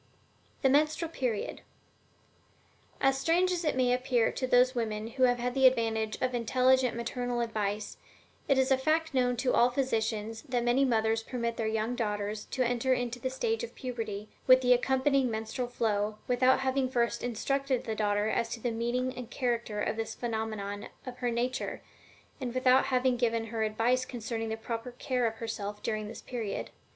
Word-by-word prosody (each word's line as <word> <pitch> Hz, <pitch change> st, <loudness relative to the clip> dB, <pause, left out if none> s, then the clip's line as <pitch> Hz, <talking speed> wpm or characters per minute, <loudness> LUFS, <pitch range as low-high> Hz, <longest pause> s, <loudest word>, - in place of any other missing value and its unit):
THE 265 Hz, -, +5 dB
MENSTRUAL 305 Hz, +4 st, +2 dB
PERIOD. 245 Hz, -9 st, -2 dB, 1.4 s
As 270 Hz, 0 st, +2 dB
strange 355 Hz, +5 st, +2 dB
as 355 Hz, -1 st, -1 dB
it 305 Hz, -, +1 dB
may 250 Hz, -1 st, +3 dB
appear 250 Hz, -2 st, +2 dB
to 255 Hz, -, -3 dB
those 250 Hz, +1 st, +5 dB
women 220 Hz, -2 st, -2 dB
who 255 Hz, +2 st, +3 dB
have 245 Hz, -1 st, +3 dB
had 245 Hz, +1 st, -2 dB
the 265 Hz, 0 st, +6 dB
advantage 225 Hz, -3 st, 0 dB
of 255 Hz, 0 st, 0 dB
intelligent 255 Hz, +1 st, +3 dB
maternal 245 Hz, +1 st, -2 dB
advice, 215 Hz, -3 st, -2 dB, 0.5 s
it 275 Hz, -, +3 dB
is 265 Hz, +1 st, +2 dB
a 265 Hz, -, +4 dB
fact 315 Hz, +3 st, +1 dB
known 250 Hz, -2 st, +2 dB
to 255 Hz, +1 st, +1 dB
all 240 Hz, -, +5 dB
physicians 225 Hz, -4 st, -1 dB
that 245 Hz, -2 st, 0 dB
many 245 Hz, +3 st, +3 dB
mothers 225 Hz, -2 st, +2 dB
permit 235 Hz, 0 st, -3 dB
their 225 Hz, -1 st, -2 dB
young 220 Hz, +2 st, -1 dB
daughters 210 Hz, -2 st, -2 dB
to 260 Hz, -, -1 dB
enter 245 Hz, +2 st, +1 dB
into 245 Hz, 0 st, -3 dB
the 260 Hz, -, -2 dB
stage 450 Hz, -, -1 dB
of 475 Hz, -, -7 dB
puberty, 220 Hz, -5 st, -5 dB, 0.2 s
with 255 Hz, 0 st, +8 dB
the 250 Hz, -1 st, +5 dB
accompanying 265 Hz, +1 st, +2 dB
menstrual 220 Hz, +3 st, -3 dB
flow, 215 Hz, -3 st, -1 dB
without 255 Hz, +1 st, +3 dB
having 265 Hz, 0 st, +1 dB
first 235 Hz, -2 st, 0 dB
instructed 260 Hz, +2 st, -1 dB
the 225 Hz, -, -3 dB
daughter 210 Hz, -1 st, +1 dB
as 230 Hz, +1 st, 0 dB
to 230 Hz, -, -5 dB
the 240 Hz, +1 st, -1 dB
meaning 240 Hz, +3 st, -1 dB
and 245 Hz, -2 st, -7 dB
character 235 Hz, -5 st, -2 dB
of 215 Hz, -, -1 dB
this 225 Hz, -1 st, -3 dB
phenomenon 215 Hz, -3 st, -3 dB, 0.2 s
of 255 Hz, -1 st, -8 dB
her 245 Hz, -, 0 dB
nature, 245 Hz, +2 st, -2 dB, 0.6 s
and 255 Hz, -2 st, -4 dB
without 255 Hz, 0 st, +4 dB
having 255 Hz, -1 st, +2 dB
given 230 Hz, -1 st, +1 dB
her 225 Hz, -, -1 dB
advice 225 Hz, +4 st, +1 dB
concerning 230 Hz, -2 st, -4 dB
the 220 Hz, -, -3 dB
proper 230 Hz, +2 st, -5 dB
care 250 Hz, -1 st, 0 dB
of 225 Hz, -, -3 dB
herself 210 Hz, -2 st, -5 dB
during 215 Hz, -1 st, -2 dB
this -, -, -8 dB
period. 230 Hz, -5 st, -4 dB
245 Hz, 180 wpm, -30 LUFS, 225-255 Hz, 1.4 s, with